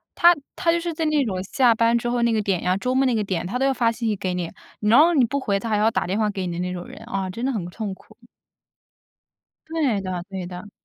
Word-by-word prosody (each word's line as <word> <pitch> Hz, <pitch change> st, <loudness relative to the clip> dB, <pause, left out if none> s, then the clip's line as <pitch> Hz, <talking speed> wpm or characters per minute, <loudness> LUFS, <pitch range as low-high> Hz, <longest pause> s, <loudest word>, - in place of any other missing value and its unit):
他 345 Hz, +1 st, +6 dB, 0.2 s
他 335 Hz, -, +2 dB
就 340 Hz, -, +1 dB
是 340 Hz, -1 st, -3 dB
在 320 Hz, 0 st, -2 dB
那 305 Hz, -2 st, +2 dB
种 190 Hz, -5 st, -2 dB
下 240 Hz, +4 st, +3 dB
班 230 Hz, +1 st, +3 dB
之 240 Hz, +1 st, -2 dB
后 240 Hz, 0 st, 0 dB
那 235 Hz, -1 st, +3 dB
个 215 Hz, -, +1 dB
点 195 Hz, -4 st, 0 dB
呀 180 Hz, +1 st, +2 dB
周 250 Hz, +5 st, -1 dB
末 270 Hz, 0 st, +3 dB
那 250 Hz, -3 st, +2 dB
个 215 Hz, -, +1 dB
点， 185 Hz, -3 st, -2 dB
他 225 Hz, +7 st, -2 dB
都 270 Hz, -, +2 dB
要 270 Hz, -, +3 dB
发 235 Hz, -3 st, +2 dB
信 230 Hz, 0 st, -3 dB
息 210 Hz, -, +1 dB
给 185 Hz, -1 st, -3 dB
你， 175 Hz, -2 st, -3 dB, 0.3 s
然 220 Hz, +6 st, +5 dB
后 335 Hz, +3 st, +6 dB
你 270 Hz, -6 st, +4 dB
不 280 Hz, +5 st, -2 dB
回 200 Hz, -6 st, 0 dB
他 230 Hz, -, -5 dB
还 210 Hz, -, +2 dB
要 215 Hz, +2 st, +4 dB
打 -, -, 0 dB
电 195 Hz, +4 st, -1 dB
话 215 Hz, -1 st, +2 dB
给 195 Hz, -3 st, -3 dB
你 175 Hz, -, -3 dB
的 170 Hz, -, -4 dB
那 180 Hz, 0 st, -2 dB
种 175 Hz, -1 st, -6 dB
人， -, -, -11 dB
啊， 195 Hz, -4 st, -3 dB
真 230 Hz, +7 st, -6 dB
的 270 Hz, -, +1 dB
很 200 Hz, -8 st, -3 dB
痛 200 Hz, +1 st, -5 dB
苦。 -, -, -21 dB, 1.5 s
对 285 Hz, -11 st, 0 dB
的， 185 Hz, -2 st, -4 dB
对 190 Hz, -2 st, -5 dB
的。 180 Hz, +3 st, -8 dB
220 Hz, 305 characters per minute, -23 LUFS, 190-255 Hz, 1.5 s, 他